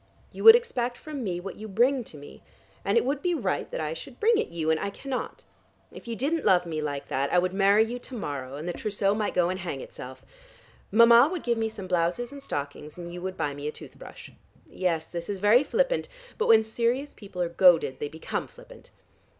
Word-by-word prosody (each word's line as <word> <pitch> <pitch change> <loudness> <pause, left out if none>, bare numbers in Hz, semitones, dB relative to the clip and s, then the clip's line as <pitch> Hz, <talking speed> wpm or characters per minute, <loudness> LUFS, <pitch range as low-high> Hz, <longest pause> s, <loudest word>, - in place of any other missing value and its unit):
You - - -8
would 450 0 +12
expect 250 - -1
from 295 -4 -7
me 180 -4 -2
what 190 +2 -8
you 220 - -8
bring 245 +6 +2
to 155 - -11
me, 145 - -13 0.4
and - - +1
it 465 - +3
would 280 +1 -1
be 355 -1 0
right 205 - -2
that - - -5
I 155 0 -2
should 240 +10 -10
bring 450 0 +3
it - - -1
you, 160 -2 -1
and 160 - +1
I - - -2
cannot. 260 +5 -6 0.5
If - - -12
you 230 - -3
didn't 295 +7 -1
love 180 -1 +4
me 160 -2 -3
like 145 -2 -4
that, 135 +1 -1
I - - +3
would 180 +1 +1
marry 200 +2 +4
you 240 +2 -5
to 250 - -10
morrow, 140 - -5
and 155 +4 -6
the 175 - -2
trousseau 200 -1 0
might 210 0 -2
go 175 -1 +3
and 185 +1 -3
hang 175 -7 -5
itself. 130 0 -10 0.7
Mama 235 +5 +7
would 360 -4 -4
give 235 -2 0
me 225 0 0
some 205 -3 -8
blouses 180 +7 -1
and 280 0 -9
stockings, 145 - -6
and 175 -1 -8
you 175 - -7
would 185 0 -5
buy 150 -3 -1
me 145 +1 -6
a - - -2
tooth - - -12
brush. - - -11 0.4
Yes, 170 -4 -1
this 170 +1 -6
is 200 - -2
very 210 +7 +5
flippant, - - 0 0.3
but 445 - +1
when 220 -1 +6
serious 235 +6 -1
people 195 -3 -11
are 175 -1 0
goaded 170 -5 +4
they 145 - -3
become 160 +1 -4
flippant. - - -16
195 Hz, 230 wpm, -27 LUFS, 170-245 Hz, 0.7 s, would